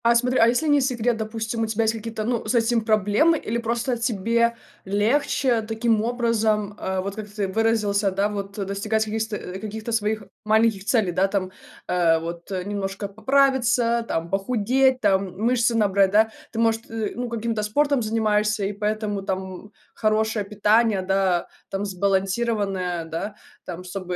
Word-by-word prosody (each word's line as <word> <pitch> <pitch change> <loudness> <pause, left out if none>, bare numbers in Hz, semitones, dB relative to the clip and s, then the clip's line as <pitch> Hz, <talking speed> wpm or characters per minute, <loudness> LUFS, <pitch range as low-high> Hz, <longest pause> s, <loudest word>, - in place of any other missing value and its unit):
А 235 0 +5
смотри, 250 +2 +2
а 225 - +6
если 245 +7 +1
не 290 -1 +4
секрет, 245 -3 0
допустим, 225 +1 -3
у - - +2
тебя 220 +1 0
есть 220 0 +2
какие-то, 225 -1 -5
ну, 235 +1 -1
с 215 - 0
этим 230 0 +2
проблемы 215 - +3
или 235 -4 -3
просто 235 +2 -1
тебе 235 0 +1 0.3
легче 230 +4 +1
таким 225 0 0
образом, 220 -3 0
э, 190 0 -2
вот 200 +1 -5
как 215 -1 -7
ты 205 -1 -2
выразился, 210 -1 +1
да, 195 +2 0
вот, 200 -1 -6
э, 200 - -2
достигать 215 +3 -1
каких, 220 +1 -2
сто 220 -1 -3
каких-то 215 +5 -6
своих 215 -1 0 0.2
маленьких 215 -2 +2
целей, 220 -5 +2
да, 185 +3 +2
там, 190 -2 -2 0.4
э, 170 -2 +3
вот, 170 +2 -6
э, 185 -2 -2
немножко 200 0 -4
поправиться, 240 0 +2
там, 165 +1 -3
похудеть, 250 +6 +2
там, 190 -3 +1
мышцы 235 +2 +2
набрать, 200 -3 +3
да? 220 +3 +3 0.2
Ты, 225 - -8
может, 225 0 +1
э, 225 -2 -3
ну, 245 0 -3
каким-то 230 -1 -2
спортом 280 +6 +1
занимаешься, 210 -2 +1
и 200 - -2
поэтому 210 0 -2
там 190 +1 -5 0.2
хорошее 215 -1 0
питание, 210 0 +2
да, 190 -2 +1 0.2
там, 195 +1 -3
сбалансированное, 195 -2 -1
да, 165 +6 -5 0.3
там, 180 0 -7
чтобы 180 0 -5
215 Hz, 165 wpm, -23 LUFS, 195-230 Hz, 0.4 s, а